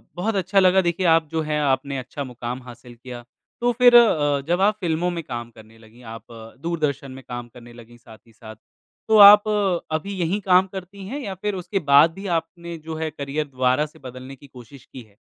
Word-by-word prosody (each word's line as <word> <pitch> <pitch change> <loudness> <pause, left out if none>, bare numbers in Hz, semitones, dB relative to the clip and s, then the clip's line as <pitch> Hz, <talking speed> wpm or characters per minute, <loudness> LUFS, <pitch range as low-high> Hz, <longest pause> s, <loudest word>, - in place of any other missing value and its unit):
बहुत 205 +4 -2
अच्छा 190 +1 +1
लगा 190 0 +4
देखिए 175 +1 -2
आप 165 -1 +1
जो 160 +1 -2
है, 150 -1 -2
आपने 135 0 -1
अच्छा 130 +3 -6
मुकाम 125 0 -7
हासिल 120 0 -13
किया। 120 0 -10 0.4
तो 245 0 +2
फिर 245 0 +5
अ, 145 -12 +4
जब 175 +2 0
आप 210 +1 +2
फिल्मों 175 -1 -1
में 170 -2 -5
काम 120 -2 -7
करने 110 0 -18
लगीं, 115 +2 -19
आप 115 0 -10 0.4
दूरदर्शन 150 -5 -3
में 130 0 -11
काम 120 -1 -7
करने 120 -1 -14
लगीं 120 0 -15
साथ 110 -1 -16
ही 115 - -22
साथ, 110 -1 -12 0.5
तो 220 - +4
आप 205 +1 +9 0.5
अभी 200 +5 -8
यहीं 175 +4 -1
काम 185 0 +3
करती 190 +1 -10
हैं 280 +6 -5
या 200 -8 -6
फिर 205 +2 -4
उसके 190 +2 -3
बाद 145 +4 +6
भी 195 +3 -8
आपने 170 0 -8
जो 160 0 -8
है, 160 0 -3
करियर 145 +1 -4
दोबारा 130 +2 0
से 150 - -16
बदलने 130 +1 -10
की 140 +2 -17
कोशिश 125 +1 -15
की 130 - -12
है? 105 -3 -21
150 Hz, 210 wpm, -22 LUFS, 125-185 Hz, 0.5 s, आप